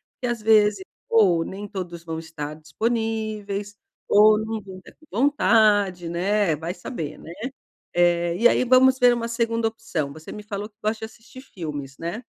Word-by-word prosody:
Porque 250 - -4
às 235 -2 -2
vezes 210 -3 +4 0.3
ou 185 -7 +4
nem 200 +3 -7
todos 175 -4 -6
vão 165 -1 -5
estar 155 -2 -7
disponíveis, 210 +3 -3 0.3
ou 215 +1 +6
não 220 0 -4
vão 190 -1 -10
estar 185 - -14
com 310 - -20
vontade, 210 - +3
né, 185 0 +1
vai 165 +4 -5
saber, 165 - -6
né. 165 - -10 0.6
Eh, 175 -1 +2
e 235 +4 +5
aí - - +2
vamos 260 +1 +5
ver 245 -1 +6
uma 230 -1 -3
segunda 230 -1 0
opção, 180 -11 -4
você 155 +1 -11
me 210 - -8
falou 205 0 -5
que 210 - -40
gosta 215 +1 -1
de - - -5
assistir 255 +4 -14
filmes, 145 - -7
né. 175 +9 -5
205 Hz, 175 wpm, -24 LUFS, 170-225 Hz, 0.6 s, ou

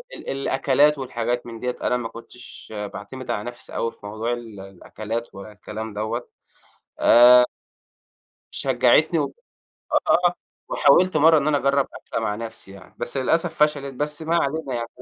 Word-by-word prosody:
ال - - -9
الأكلات 135 +2 +2
والحاجات 120 -2 -3
من 115 -1 -8
ديَّة 125 0 -3
أنا 125 - +1
ما 115 -2 -4
كنتش 115 -1 -12 0.2
باعتمد 130 +6 -7
على 105 - -2
نفسي 120 0 -9
أوي 115 - -1
في - - -17
موضوع 110 +3 -3
ال 115 -4 -8
الأكلات 110 +4 -7
ولا 100 +2 -9
الكلام 105 +1 -7
دوَّة 110 +3 -3 0.7
آآ 125 +1 +7 1.1
شجّعتني - - +3
و - - -2 0.8
آه، 175 0 +4 0.4
وحاولت 175 +5 +4
مرّة 160 +2 +6
إن 145 0 0
أنا 150 -1 +3
أجرّب 140 0 +1
أكلة - - -5
مع 105 -2 -1
نفسي 110 -3 -8
يعني، 95 -2 -15
بس 130 - -4
للأسف 165 +5 +1
فشلت 140 -2 -1
بس 150 +4 -3
ما 160 +1 0
علينا 135 -5 -3
125 Hz, 150 wpm, -23 LUFS, 115-140 Hz, 1.1 s, آآ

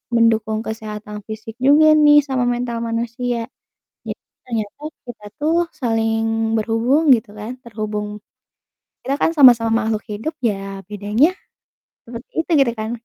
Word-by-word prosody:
mendukung 220 -2 +2
kesehatan 215 -1 -6
fisik 220 +1 -8
juga 295 +4 +6
nih 295 -1 +6
sama 260 -2 0
mental 240 -1 -2
manusia. 235 +1 -2 0.6
Jadi - - -4 0.3
ternyata 225 +1 -4 0.3
kita 220 -3 -10
tuh 310 +2 +1 0.2
saling 225 -3 0
berhubung, 235 +8 +2
gitu 225 -2 -6
kan, 215 +4 -7
terhubung 210 -2 -5 0.9
kita 275 - -1
kan - - +3
sama-sama 240 -7 +6
makhluk 220 -1 -2
hidup 225 +10 -4
ya 195 -3 -2
bedanya 210 - +2 0.8
seperti 235 +2 -10
itu 330 - -6
gitu 235 - -1
kan. 215 +1 -3
230 Hz, 130 wpm, -20 LUFS, 215-250 Hz, 0.9 s, juga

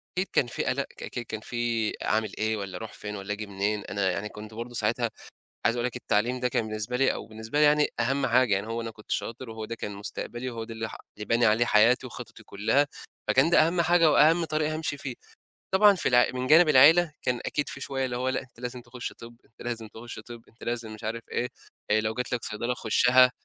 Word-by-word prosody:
أكيد 185 +2 0
كان 125 - +3
في 120 - -3
قَلَق، 140 +2 0
ك - - -8
ك - - -5
كان 110 - -4
فيه 115 -1 -1
أعمل 110 -1 +1
إيه 110 0 0
والّا 100 -2 -5
أروح 110 -1 -8
فين 105 0 -6
والّا 100 +1 -4
آجي 105 0 -6
منين؟ 100 +1 -1
أنا 100 -2 0
يعني 105 +3 -3
كنت 105 +1 -10
برضه 120 +2 -7
ساعتها - - +1 0.6
عايز 115 - +3
أقول 120 0 -1
لك 125 - -3
التعليم 125 +1 0
ده 125 - +1
كان 115 -2 -1
بالنسبة 110 +3 -3
لي 135 +1 +3
أو - - -6
بالنسبة 110 +5 -3
لي 150 - +6
يعني 150 0 +4
أهَم 135 +3 +1
حاجة، 120 -2 +4
يعني 100 +2 -1
هو 115 +1 -3
أنا 115 0 -5
كنت 105 -1 -14
شاطر 115 +1 -3
وهو 110 -1 -6
ده 115 +2 -5
كان 105 - -5
مستقبلي 120 +5 -4
وهو 115 -2 -5
ده 115 - -8
اللي 110 0 -4
ح - - -9 0.2
اللي 105 - -6
باني 115 +3 +3
عليه 110 +2 +4
حياتي 120 +4 +4
وخططي 115 -2 -9
كُلّها، 110 +9 +1 0.4
فكان 135 +5 +4
ده 160 -2 +5
أهَم 170 +1 +1
حاجة 170 -1 +4
وأهَم 165 +4 +5
طريق 155 0 0
هامشي 155 -2 -2
فيه. 135 -3 -6 0.6
طبعًا 205 +1 +7
في 180 - 0
الع 120 -1 +5
من 130 0 -2
جانب 160 +3 +7
العيلة، 155 +5 +7
كان 125 -1 0
أكيد 145 -1 -1
فيه 140 - -8
شوية 135 -1 -2
اللي 125 -1 -3
هو 130 +1 0
لأ، 130 - -1
أنت 120 - -18
لازم 125 0 -5
تخُش 120 +1 -7
طِب، 120 0 -12
أنت - - -21
لازم 115 -2 -4
تخُش 115 +2 -9
طِب، 120 -1 -10
أنت 115 - -17
لازم 115 -2 -3
مش 110 - -12
عارف 115 +2 -3
إيه، 125 - 0 0.4
آآ 110 - +4
لو 110 +1 -1
جات 125 +1 -4
لك 120 - -2
صيدلة 120 +3 -2
خُشّها 125 +2 +4
120 Hz, 240 wpm, -27 LUFS, 110-130 Hz, 0.6 s, طبعًا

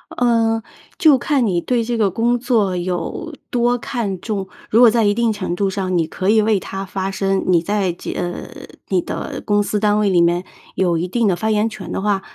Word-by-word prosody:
呃， 225 -2 +2 0.3
就 305 -5 +6
看 265 0 +1
你 185 -5 +1
对 240 +5 0
这 235 +1 -2
个 210 -3 +2
工 235 +5 +1
作 220 -7 +1
有 180 - -4 0.2
多 245 0 +1
看 225 -6 -3
重。 200 -4 -3 0.2
如 225 - +3
果 240 -1 +8
在 230 +1 +2
一 205 -1 +3
定 230 0 +1
程 190 -4 -3
度 195 +1 0
上， 185 -2 -1
你 165 -2 +1
可 185 +4 -2
以 220 +1 +5
为 215 -1 +2
它 195 +1 -6
发 190 0 -3
声， 195 0 0
你 175 -2 +4
在 200 +1 0
这 170 - -7
呃， 175 0 -4 0.4
你 185 -2 +1
的 - - -5
公 205 -1 +2
司 205 +1 -1
单 210 0 +3
位 210 -1 +2
里 180 -2 +4
面 175 +2 +2 0.3
有 175 -3 +1
一 170 +2 -2
定 230 +3 +1
的 190 - +2
发 220 +5 -1
言 215 +1 +2
权 190 -5 -8
的 - - -2
话， 200 -1 +1
205 Hz, 240 characters per minute, -19 LUFS, 185-230 Hz, 0.4 s, 果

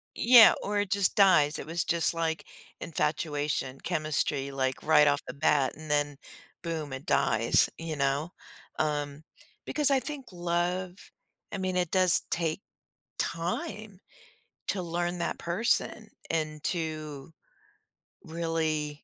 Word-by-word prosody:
Yeah, 235 -1 +8
or 205 0 -1
it 205 -2 -2
just 200 -2 +2
dies, 170 -7 +5
it - - -7
was 165 +2 -1
just, 170 0 +1
like, 165 -1 -2 0.3
infatuation, 150 -4 -2
chemistry, 145 -2 -1
like, 130 -1 -2
right 150 -1 +5
off 145 +1 +2
the 125 - -6
bat, 140 -1 +1
and 155 -1 -11
then 145 -1 0 0.4
boom, 160 -5 -4
it 130 +2 -7
dies, 115 0 +2
you 165 -2 -5
know, 140 +3 0 0.5
um, 145 -1 -2 0.4
because 300 -2 +2
I 270 - +4
think 285 -2 -6
love 175 +1 -2 0.6
I 200 - -4
mean, 185 -1 -2
it 175 -2 0
does 185 -2 +6
take 165 +2 -1 0.6
time 190 +4 -3 0.7
to 190 - -1
learn 175 +1 -3
that 170 - -2
person 180 +8 -1 0.2
and 155 -2 -2
to 155 -4 -4 0.9
really 160 -3 -2
160 Hz, 130 wpm, -28 LUFS, 150-180 Hz, 0.9 s, Yeah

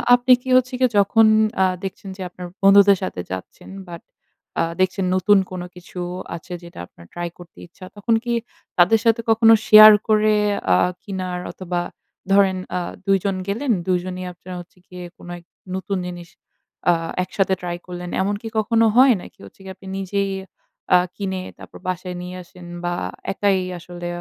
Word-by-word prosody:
আপনি 245 +1 +1
কি 260 - -8
হচ্ছে 255 0 0
গিয়ে 255 -2 +3
যখন 225 +3 +4 0.4
আ - - +5 0.2
দেখছেন 195 +1 -6
যে, 190 - -9
আপনার 180 0 -9 0.2
বন্ধুদের 200 0 +7
সাথে 90 - -4
যাচ্ছেন 95 0 -8 0.2
বাট 170 -1 -9 0.6
আ - - +3 0.2
দেখছেন 185 0 +1
নতুন 200 +2 +4
কোন 185 -1 -5
কিছু 180 0 -10 0.4
আছে 170 +2 -9
যেটা 170 - -12
আপনার 85 - -17
ট্রাই 175 0 -4
করতে 175 -1 -15
ইচ্ছা, 185 +2 -13
তখন 215 +3 0
কি 240 -1 -2 0.4
তাদের 185 +6 +5
সাথে 230 0 +3
কখনো 225 0 +6
শেয়ার 215 0 +11 0.2
করে 215 -1 +3 0.4
আ - - +6 0.3
কিনার 185 -2 -4
অথবা 175 -1 -3 0.5
ধরেন 195 -1 +4 0.2
আ - - 0 0.3
২ 195 0 +4
জন 195 -1 0
গেলেন 235 +6 -1 0.2
২ 185 - +3
জনই 185 0 -5
আপনার 180 +1 -10
হচ্ছে 175 - -19
গিয়ে 180 0 -9
কোন - - -14
এক 170 - -23 0.3
নতুন 190 +1 -3
জিনিস 175 -1 -8 0.6
আ - - +4 0.3
একসাথে 190 +1 0
ট্রাই 175 -1 -4
করলেন, 180 0 -7
এমনকি 205 +3 -2
কখনো 225 +1 +2
হয়? 260 +1 +7
নাকি - - -14
হচ্ছে 100 - -17
গিয়ে 190 0 -8
আপনি 190 +1 -14
নিজেই 195 +1 -2 0.7
আ - - +9 0.2
কিনে 190 -2 -3 0.2
তারপর - - -12
বাসায় 185 0 -4
নিয়ে 180 0 -7
আসেন 180 0 -15 0.2
বা 175 - -1 0.4
একাই 195 -1 +1 0.2
আসলে 175 0 -8
190 Hz, 170 wpm, -21 LUFS, 180-205 Hz, 0.7 s, শেয়ার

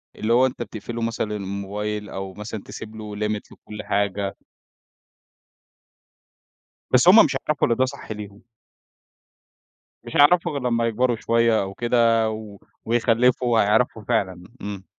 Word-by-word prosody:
اللي 110 +2 0
هو 125 +2 +5
أنت 125 - -3
بتقفل 115 +1 -6
له 115 - -3
مثلًا 115 -2 -2
الموبايل 105 +1 -4
أو 95 0 -6
مثلًا 105 +1 -7
تسيب 110 0 -9
له 105 -1 -7
limit 105 0 -2
لكل 105 0 -10
حاجة. 100 -1 -1 2.6
بس 130 +7 +5
هُم 215 +5 +9
مش - - -2
هيعرفوا 150 -2 0
إن 115 - +2
ده 130 +1 +2
صح 135 -3 -8
ليهم. 105 -1 -8 1.6
مش - - -9
هيعرفوا 170 +3 +5
غير 140 - -3
لمّا 115 -2 +1
يكبروا 120 +2 +1
شوية 115 0 +2
أو 95 0 -6
كده 115 -1 +2
و 110 -2 -8 0.3
ويخلفوا 120 +1 +2
وهيعرفوا 110 +1 +2
فعلًا. 95 -6 -1 0.2
إمم. 100 -2 -6
110 Hz, 140 wpm, -23 LUFS, 105-120 Hz, 2.6 s, هُم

